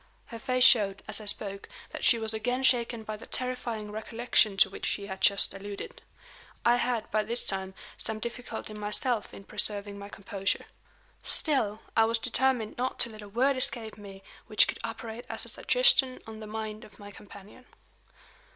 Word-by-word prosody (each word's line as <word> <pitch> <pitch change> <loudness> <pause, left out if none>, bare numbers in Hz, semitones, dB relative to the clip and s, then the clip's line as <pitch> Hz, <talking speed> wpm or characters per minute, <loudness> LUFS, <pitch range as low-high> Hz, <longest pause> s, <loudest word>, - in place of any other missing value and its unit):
Her 230 - -9
face 255 0 +2
showed, 205 -6 +5
as - - +3
I - - -9
spoke, 200 -1 +2 0.2
that - - -7
she 235 - +5
was 220 -1 +1
again 245 +4 -2
shaken 235 -3 +1
by 215 0 -6
the - - -12
terrifying 245 -4 -4
recollection 220 -1 +1
to 195 - +6
which - - -5
she 200 - -2
had 190 -1 -7
just 200 -1 +5
alluded. 200 +1 -8 0.6
I 240 +1 +5
had, 240 -3 -2
by 215 - +2
this 235 +3 -1
time, 190 -1 -3 0.2
some 220 - +1
difficulty 230 -1 -6
myself 210 +2 0
in 195 - -11
preserving 205 0 +1
my 200 0 -9
composure. 195 -1 -3 0.6
Still, 225 -9 +1
I 225 - +5
was 230 +1 +1
determined 250 -1 0
not 255 +1 -2
to 235 - 0
let 215 -1 -11
a 205 - -11
word 260 +6 +2
escape 230 -3 0
me 195 -2 -12 0.2
which 215 -1 +4
could - - -5
operate 230 +1 -6
as - - 0
a - - -5
suggestion - - +4
on 220 -1 -9
the 215 - -8
mind 215 0 -6
of 205 - -16
my 205 0 -11
companion. 205 +4 -14
220 Hz, 180 wpm, -28 LUFS, 205-240 Hz, 0.6 s, to